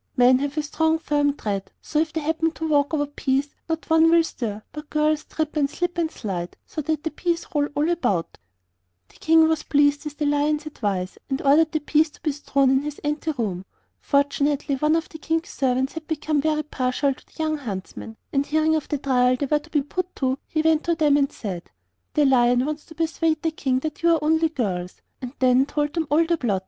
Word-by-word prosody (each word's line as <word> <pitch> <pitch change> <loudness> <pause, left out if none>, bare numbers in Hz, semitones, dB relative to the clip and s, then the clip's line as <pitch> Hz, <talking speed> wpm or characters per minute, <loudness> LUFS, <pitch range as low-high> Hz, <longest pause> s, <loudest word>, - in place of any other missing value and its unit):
Men 250 +1 +6
have 285 +2 -3
a 305 - +1
strong, 320 +2 +1
firm 290 -2 0
tread, 195 -2 -3
so 300 - -2
that 320 - +2
if 315 - -22
they 320 - -1
happen 320 +2 0
to 320 - -4
walk 290 -2 +2
over 295 -2 +1
peas 280 0 -1 0.2
not 325 0 -3
one 320 0 +5
will 335 0 +5
stir, 215 -9 -5
but 300 -1 -9
girls 305 0 +1
trip, 315 -1 -3
and 285 -2 +2
slip, 355 +4 -2
and 325 -2 +1
slide, 180 - -5
so 310 - -5
that 305 0 -2
the 320 - -2
peas 340 +2 -2
roll 290 -1 +2
all 295 +2 +1
about.' 205 - -1 0.7
The - - -21
King 320 0 +5
was 320 -1 +1
pleased 290 0 +2
with 295 -1 -6
the 300 - -1
Lion's 295 +1 +1
advice, 200 -10 -3
and 270 0 -1
ordered 305 +3 +4
the 310 -2 -1
peas 305 +2 +2
to - - -21
be 305 - +1
strewn 275 -2 +1
in 265 0 +3
his 295 0 -5
ante 300 +2 -1
room. 200 -9 -3 0.4
Fortunately 285 0 +1
one 300 +4 +2
of 330 -1 -1
the 320 - -11
King's 325 +2 -1
servants 260 0 0
had 320 -1 -8
become 305 -2 0
very 305 0 0
partial 275 -1 0
to - - -19
the - - -28
young 310 -1 0
huntsmen, 220 -1 -7 0.2
and 275 0 +1
hearing 315 +1 +2
of 310 - -2
the 295 - 0
trial 255 -2 +2
they 280 - -2
were 295 +2 +2
to 300 +2 -18
be 295 -3 +1
put 365 +5 -4
to, 265 0 -1
he 310 -1 -1
went 320 -1 +3
to 340 -1 +2
them 300 -3 +3
and 280 -1 +2
said: 185 -6 -6 0.5
'The 295 - +4
Lion 245 -1 +4
wants 305 0 -4
to 320 - -14
persuade 320 -1 0
the 325 - +1
King 265 -4 0
that 310 +1 -5
you 340 - +4
are 310 - -3
only 320 +1 +3
girls'; 185 - -3 0.2
and 250 0 -6
then 255 +1 +4
told 295 0 -1
them 330 -3 -1
all 320 +3 +4
the 340 0 +1
plot. 205 -6 0
295 Hz, 230 wpm, -23 LUFS, 265-315 Hz, 0.7 s, Men